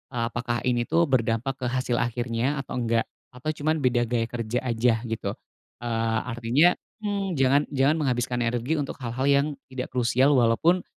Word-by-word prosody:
eee, 115 Hz, -, 0 dB
apakah 120 Hz, -1 st, -2 dB
ini 120 Hz, -2 st, 0 dB
tuh 170 Hz, -, +3 dB
berdampak 125 Hz, +2 st, 0 dB
ke 125 Hz, -, -2 dB
hasil 125 Hz, -1 st, 0 dB
akhirnya 120 Hz, +3 st, -1 dB
atau -, -, -5 dB
enggak, 115 Hz, -1 st, +1 dB, 0.3 s
atau 140 Hz, +5 st, -2 dB
cuman 155 Hz, 0 st, -1 dB
beda 120 Hz, -2 st, +2 dB
gaya 115 Hz, -1 st, -1 dB
kerja 120 Hz, +1 st, -2 dB
aja 115 Hz, -1 st, +1 dB
gitu. 110 Hz, -4 st, -3 dB, 0.5 s
Eee, 115 Hz, -1 st, 0 dB
artinya 125 Hz, +8 st, +3 dB, 0.3 s
mhm, 200 Hz, -4 st, -1 dB
jangan 135 Hz, +1 st, +4 dB
jangan 140 Hz, +2 st, +2 dB
menghabiskan 125 Hz, -3 st, 0 dB
energi 120 Hz, +6 st, 0 dB
untuk 140 Hz, -, -3 dB
hal-hal 130 Hz, +1 st, -3 dB
yang 140 Hz, +1 st, +4 dB, 0.2 s
tidak 130 Hz, -1 st, -5 dB
krusial 130 Hz, +3 st, +3 dB
walaupun, 130 Hz, +10 st, +3 dB
125 Hz, 165 wpm, -25 LUFS, 115-140 Hz, 0.5 s, jangan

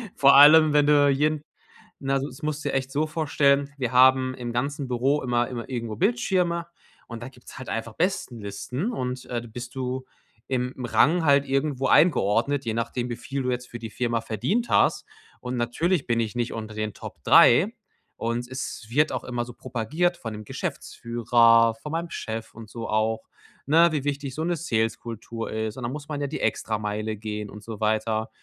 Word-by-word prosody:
Vor 140 Hz, 0 st, +6 dB
allem, 155 Hz, +2 st, +8 dB
wenn 145 Hz, -1 st, +4 dB
du 145 Hz, -1 st, +5 dB
jeden 150 Hz, +2 st, +1 dB, 0.6 s
na, 135 Hz, 0 st, 0 dB
so 135 Hz, -, -3 dB
is 130 Hz, -, -12 dB
das -, -, -18 dB
musst 155 Hz, -1 st, -2 dB
du -, -, +1 dB
dir -, -, -2 dB
echt 135 Hz, 0 st, -1 dB
so 150 Hz, +3 st, +1 dB
vorstellen, 145 Hz, -3 st, +1 dB
wir 125 Hz, -4 st, -2 dB
haben 130 Hz, 0 st, +5 dB
im 120 Hz, -2 st, -5 dB
ganzen 140 Hz, +2 st, -2 dB
Büro 130 Hz, +4 st, +1 dB
immer 120 Hz, -1 st, 0 dB
immer 120 Hz, -2 st, -6 dB
irgendwo 115 Hz, -4 st, -4 dB
Bildschirme 185 Hz, -5 st, +1 dB, 0.4 s
und 115 Hz, 0 st, -7 dB
da -, -, -6 dB
gibt's 125 Hz, -2 st, -15 dB
halt 130 Hz, -, -8 dB
einfach 115 Hz, 0 st, -4 dB
Bestenlisten 125 Hz, -, -2 dB
und, 125 Hz, -, -4 dB
äh, 120 Hz, -1 st, -3 dB
du 120 Hz, -, -11 dB
bist 120 Hz, +2 st, -8 dB
du 130 Hz, 0 st, -3 dB, 0.4 s
im 125 Hz, -1 st, -1 dB
Rang 165 Hz, +7 st, +3 dB
halt 140 Hz, -1 st, +4 dB
irgendwo 135 Hz, 0 st, 0 dB
eingeordnet, 140 Hz, -, +3 dB
je 115 Hz, -, -1 dB
nachdem, 120 Hz, +2 st, -2 dB
wie 120 Hz, -, -4 dB
viel 135 Hz, +2 st, -4 dB
du 125 Hz, -, 0 dB
jetzt 125 Hz, 0 st, -4 dB
für 120 Hz, -, -7 dB
die 115 Hz, -1 st, -7 dB
Firma 120 Hz, -1 st, -1 dB
verdient 130 Hz, -, -1 dB
hast. -, -, +3 dB, 0.4 s
Und 125 Hz, 0 st, -4 dB
natürlich 135 Hz, +7 st, 0 dB
bin 115 Hz, -1 st, +1 dB
ich 115 Hz, 0 st, -2 dB
nicht 120 Hz, -1 st, -2 dB
unter 110 Hz, -1 st, -6 dB
den 110 Hz, -1 st, -3 dB
Top -, -, -10 dB
3 -, -, +6 dB, 0.4 s
und 120 Hz, +1 st, -2 dB
es 130 Hz, -3 st, -6 dB
wird 150 Hz, +6 st, +2 dB
auch -, -, -3 dB
immer 120 Hz, -1 st, -3 dB
so 120 Hz, -, -10 dB
propagiert 140 Hz, +10 st, -1 dB
von 115 Hz, -2 st, -6 dB
dem 105 Hz, 0 st, -8 dB
Geschäftsführer, 115 Hz, +1 st, +2 dB
von 150 Hz, +7 st, -9 dB
meinem 165 Hz, +1 st, -3 dB
Chef 110 Hz, 0 st, -6 dB
und 110 Hz, -1 st, -10 dB
so 115 Hz, +1 st, -6 dB
auch, 110 Hz, +1 st, -1 dB, 0.4 s
ne, 165 Hz, +3 st, +5 dB
wie 145 Hz, -3 st, -2 dB
wichtig 140 Hz, -2 st, -3 dB
so 160 Hz, -, -3 dB
'ne 175 Hz, +1 st, 0 dB
Sales-Kultur 115 Hz, -, -3 dB
ist. 110 Hz, 0 st, -3 dB
Und 130 Hz, -, -6 dB
dann 120 Hz, -, -2 dB
muss 145 Hz, -1 st, -7 dB
man 145 Hz, -, -3 dB
ja 145 Hz, -, -1 dB
die 150 Hz, -, -5 dB
Extrameile 110 Hz, 0 st, -2 dB
gehen 105 Hz, -1 st, -5 dB
und 105 Hz, 0 st, -11 dB
so 110 Hz, -2 st, -8 dB
weiter. 110 Hz, +1 st, 0 dB
125 Hz, 200 wpm, -25 LUFS, 115-145 Hz, 0.6 s, allem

